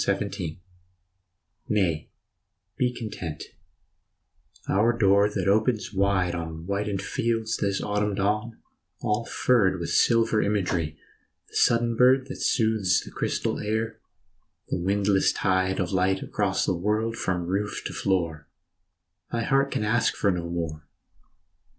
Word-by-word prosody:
89 - - +3
FALL 80 -1 -4 1.1
NAY, 90 -7 0 0.7
be 125 -1 +1
content 95 - -6 1.2
our 115 +4 +2
door 100 -1 +4
that 105 - -2
opens 110 0 +1
wide 95 -2 +1
On 80 -1 -5
whitened 100 0 -2
fields 115 -1 -1
this 100 -1 -1
autumn 105 0 0
dawn, 105 +4 -1 0.5
all 105 +2 0
furred 100 -7 +2
With 85 - -4
silver 115 -2 +3
imagery, 90 -7 -1 0.5
the - - -16
sudden 115 0 +3
bird 130 +2 +5
That 135 - -7
soothes 110 -6 +2
the - - -11
crystal - - -2
air, 110 +1 -2 0.7
the - - -1
windless 100 +1 +2
tide 95 -1 0
Of 90 -2 -1
light 95 0 +1
across 95 -2 0
the - - +1
world 105 +5 0
from 90 -5 -2
roof 100 +4 -2
to - - -4
floor 85 -6 -1 0.8
Thy 115 -1 -1
heart 135 +3 +2
can 105 - -2
ask 115 +3 +1
no 90 -4 +1
more. 80 -3 -4
100 Hz, 130 wpm, -26 LUFS, 90-110 Hz, 1.2 s, bird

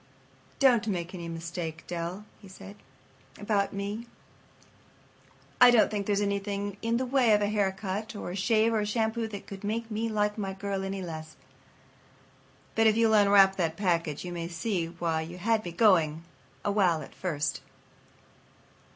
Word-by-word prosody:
"Don't 245 -5 +4
make 175 -3 -3
any 170 -2 -6
mistake, 165 -1 -5
Dell," 175 +4 -5
he 200 - -14
said, 195 +2 -11 0.6
"about 205 -1 0
me. 205 +4 -5 1.5
I 250 - +10
don't 235 -3 +5
think 205 -2 -3
there's 205 -1 +1
anything 200 0 -2
in 230 +1 0
the 260 - -1
way 250 -3 +3
of 210 - +3
a 205 - +1
haircut 205 +1 -2
or 205 - -5
a - - -5
shave 220 +3 +2
or 220 - +2
a 210 - 0
shampoo 225 +1 -1
that 205 -2 -8
could 195 0 -9
make 225 +2 -3
me 225 +2 -1
like 210 0 0
my 195 -2 -3
girl 195 0 -3
any 195 0 -4
less. 160 -2 -7 1.4
But 225 0 +4
if 220 0 +3
you'll 225 -1 +4
unwrap 200 -2 +6
that 165 -3 -1
package 170 -5 -1
you 180 - -5
may 170 -1 -4
see 170 0 -2
why 165 -1 -2
you 170 +3 -7
had 220 +3 +1
me 175 - -5
going 165 -6 +3 0.4
a 205 - +2
while 180 -7 +2
at - - -13
first." 150 -6 -2
200 Hz, 170 wpm, -28 LUFS, 175-215 Hz, 1.5 s, I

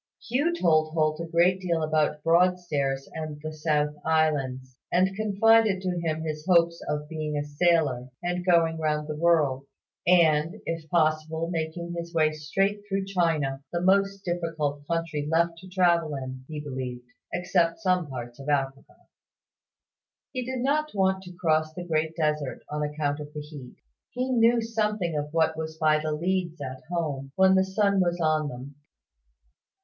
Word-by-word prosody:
Hugh 275 +8 +1
told 155 -2 +3
Holt 155 -1 +1
a 165 - -4
great 175 +3 +3
deal 170 -3 0
about 155 -1 0
Broadstairs 165 -6 +1
and 155 -2 -5
the 155 0 -5
South 150 -1 0
Sea 150 - -21
Islands, 135 -5 0 0.2
and 185 +2 +2
confided 215 0 +4
to 180 -2 -1
him 160 -1 -2
his 155 -1 -4
own 180 - +6
hopes 170 0 +3
of 150 0 -2
being 155 -1 -3
a 145 - -1
sailor, 145 -4 +1
and 180 0 -1
going 165 -2 +3
round 150 -1 -1
the 150 - -4
world; 150 -5 +2 0.4
and, 165 -1 +4
if 165 -2 -4
possible, 160 0 +1
making 170 +1 -3
his 170 0 -6
way 155 -1 +3
straight 195 +7 -1
through 195 -1 -1
China, 160 -8 0
the 170 - -1
most 195 +2 +2
difficult 160 -5 -2
country 165 -3 -2
left 165 0 +1
to 185 - -12
travel 170 -4 +2
in, 130 -1 -6
he 155 -1 -5
believed, 130 -4 -5 0.3
except 175 -1 +1
some 185 -5 +1
parts 120 -2 -7
of 140 +2 -6
Africa. 135 -1 -2 1.3
He 255 -2 -3
did 255 0 -4
not 300 +1 0
want 190 -1 +2
to 180 0 -10
cross 155 -2 +1
the 180 - -5
Great 160 -1 -1
Desert, 150 -4 -1
on 150 0 -3
account 150 0 -1
of 150 0 -8
the 150 - -4
heat. 145 -4 -10 0.3
He 255 +1 -2
knew 235 -1 +4
something 210 -6 -1
of 150 0 -3
what 160 0 +3
that 160 - -11
was 160 0 -5
by 155 -1 +3
the 155 0 -2
leads 170 +1 -1
at 130 -2 -6
home, 145 -6 -3
when 190 0 +5
the 190 0 +4
sun 200 +1 +1
was 175 -1 0
on 155 -2 +1
them. 130 +3 -9
160 Hz, 170 wpm, -26 LUFS, 150-180 Hz, 1.3 s, own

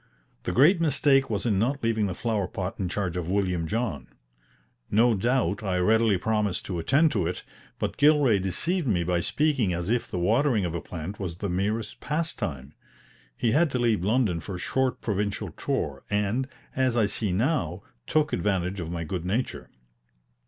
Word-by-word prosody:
The - - 0
great 165 +8 +5
mistake 140 -3 +3
was 105 0 -2
in 105 -5 +2
not 135 +5 0
leaving 110 -2 +1
the 90 - -4
flower 110 -4 -1
pot 95 +1 -5
in 95 -3 -1
charge 90 -2 -2
of 90 -1 -3
William 90 -4 0
John. 105 - -2 0.8
No 115 +3 +4
doubt 115 0 +1
I 95 -3 -1
readily 110 +2 +3
promised 105 0 -1
to 90 -3 -3
attend 140 - +3
to 95 -6 0
it, 90 - -4 0.3
but - - -3
Gilray 145 -8 +5
deceived 140 - 0
me 90 -6 +2
by 90 0 +1
speaking 135 - +1
as 85 +4 -2
if 120 0 0
the - - -4
watering 110 +3 +2
of 85 - -3
a 85 - -3
plant 85 +6 -7
was 90 -4 -4
the 100 +1 -3
merest 105 +5 -2
pastime. 85 - -3 0.6
He 115 - +1
had 155 +5 +3
to - - +1
leave 115 -6 +1
London 105 -4 +1
for 90 +4 -6
a - - -6
short 130 +6 -1
provincial 105 -1 -2
tour, 70 -2 -3
and, 105 +5 0 0.3
as 130 -2 +1
I 110 - +4
see 100 0 -1
now, 100 - 0 0.2
took 155 0 +1
advantage 95 -1 0
of 80 -2 -4
my 85 -1 -3
good 85 +1 -4
nature. 105 +8 -2
105 Hz, 180 wpm, -26 LUFS, 90-125 Hz, 0.8 s, great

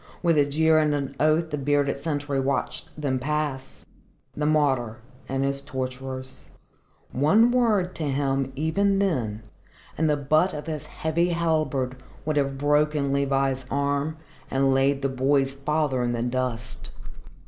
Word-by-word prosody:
With 170 -2 +4
a 145 - +5
jeer 160 +2 +3
and 150 -1 +2
an 140 -1 -3
oath 155 +1 +2
the 150 - -2
bearded 140 0 +1
sentry 145 -2 -2
watched 135 +1 -2
them 135 -3 0
pass 145 -1 -3 0.5
the 150 0 -1
martyr 135 -7 +1 0.3
and 135 +1 0
his 140 0 -1
torturers. 130 -1 -6 0.6
One 205 - +4
word 215 -7 +2
to 160 - -2
him, 135 -1 0
even 195 +7 +1
then, 120 - -1 0.5
and 160 0 +1
the 150 - +2
butt 155 +6 +2
of 150 - -6
his 155 -2 -5
heavy 165 +3 0
halberd 155 -6 0 0.3
would 155 -1 0
have 140 -1 0
broken 145 0 +2
Levi's 135 -2 0
arm 140 +2 -1 0.3
and 135 0 +2
laid 135 +1 +2
the - - +3
boy's 135 +1 +1
father 140 -1 0
in 120 0 0
the 120 0 -1
dust. 120 -3 -3
140 Hz, 150 wpm, -25 LUFS, 135-155 Hz, 0.6 s, a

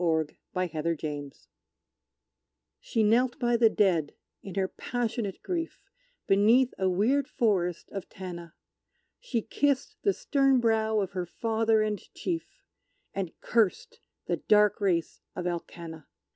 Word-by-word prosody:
The 160 -3 +1 0.2
Ballad 180 -3 -1
of 165 -1 +1
Tanna 145 -2 -4 1.5
She 225 -3 0
knelt 235 +4 +3
by 240 -1 +2
the 230 -1 +5
dead, 175 -9 +1 0.3
in 195 - -8
her 190 -1 +1
passionate 230 -3 -3
grief, 335 -3 -3 0.4
Beneath 225 +6 +4
a 190 -1 +2
weird 245 +10 +2
forest 185 - 0
of 195 -2 -6
Tanna; 170 -3 -8 0.6
She 245 - -2
kissed 285 - 0
the 400 - +2
stern 275 -6 +2
brow 220 -2 +2
of 195 -1 -3
her 180 -2 -3
father 225 +2 +1
and 210 -2 -1 0.2
chief, 335 -2 -4 0.5
And 190 -4 -4
cursed 225 -5 +1 0.3
the - - 0
dark 210 -1 +3
race 170 -5 0
of 180 - -4
Alkanna. 170 -2 -5
210 Hz, 130 wpm, -28 LUFS, 180-240 Hz, 1.5 s, the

